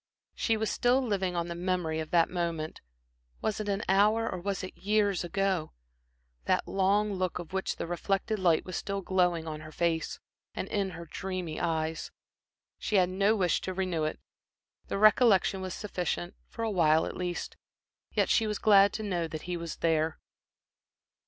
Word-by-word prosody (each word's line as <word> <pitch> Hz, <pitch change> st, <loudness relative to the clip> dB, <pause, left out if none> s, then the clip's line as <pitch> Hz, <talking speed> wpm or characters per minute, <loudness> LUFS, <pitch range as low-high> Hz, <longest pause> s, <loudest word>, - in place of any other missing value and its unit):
She 225 Hz, -2 st, +1 dB
was 220 Hz, 0 st, -1 dB
still 245 Hz, +2 st, +3 dB
living 195 Hz, -8 st, -1 dB
on 170 Hz, 0 st, -1 dB
the 170 Hz, -, -4 dB
memory 175 Hz, -2 st, -1 dB
of 155 Hz, -1 st, -4 dB
that 170 Hz, -1 st, +4 dB
moment 170 Hz, -3 st, -3 dB, 0.6 s
was 215 Hz, -1 st, -1 dB
it 210 Hz, -1 st, -3 dB
an 200 Hz, +2 st, -1 dB
hour 210 Hz, +4 st, +4 dB
or 185 Hz, -, -3 dB
was 195 Hz, +1 st, -3 dB
it 185 Hz, -, -7 dB
years 205 Hz, -2 st, +1 dB
ago? 185 Hz, -1 st, -1 dB, 0.7 s
that -, -, +1 dB
long 200 Hz, +2 st, +2 dB
look 185 Hz, -2 st, -1 dB
of 175 Hz, 0 st, -8 dB
which 190 Hz, 0 st, -1 dB
the -, -, -4 dB
reflected 195 Hz, +5 st, -1 dB
light 170 Hz, -4 st, +3 dB
was 185 Hz, -, -6 dB
still 200 Hz, 0 st, -3 dB
glowing 180 Hz, -3 st, +1 dB
on 155 Hz, -1 st, -4 dB
her 155 Hz, 0 st, -10 dB
face, 165 Hz, 0 st, -1 dB, 0.4 s
and -, -, -3 dB
in 200 Hz, -2 st, 0 dB
her 170 Hz, -, -8 dB
dreamy 180 Hz, -2 st, -4 dB
eyes. 160 Hz, -1 st, -1 dB, 0.7 s
She 215 Hz, -, -2 dB
had 180 Hz, -2 st, +4 dB
no 200 Hz, +4 st, +2 dB
wish 185 Hz, -4 st, +1 dB
to 185 Hz, -, -4 dB
renew 180 Hz, -4 st, -1 dB
it; 155 Hz, -, -3 dB, 0.7 s
the -, -, -2 dB
recollection 210 Hz, -2 st, +5 dB
was 185 Hz, -1 st, -4 dB
sufficient, 180 Hz, -3 st, -3 dB
for 230 Hz, -, -6 dB
awhile 165 Hz, -7 st, +3 dB
at -, -, -5 dB
least. 180 Hz, -1 st, -4 dB, 0.6 s
Yet -, -, +2 dB
she 225 Hz, -, +3 dB
was 210 Hz, -1 st, -1 dB
glad 200 Hz, -1 st, +6 dB
to 220 Hz, -, -4 dB
know 175 Hz, -5 st, -1 dB
that 155 Hz, -1 st, -6 dB
he 180 Hz, 0 st, -3 dB
was 170 Hz, -1 st, -5 dB
there. 160 Hz, -1 st, +1 dB
185 Hz, 180 wpm, -29 LUFS, 170-200 Hz, 0.7 s, glad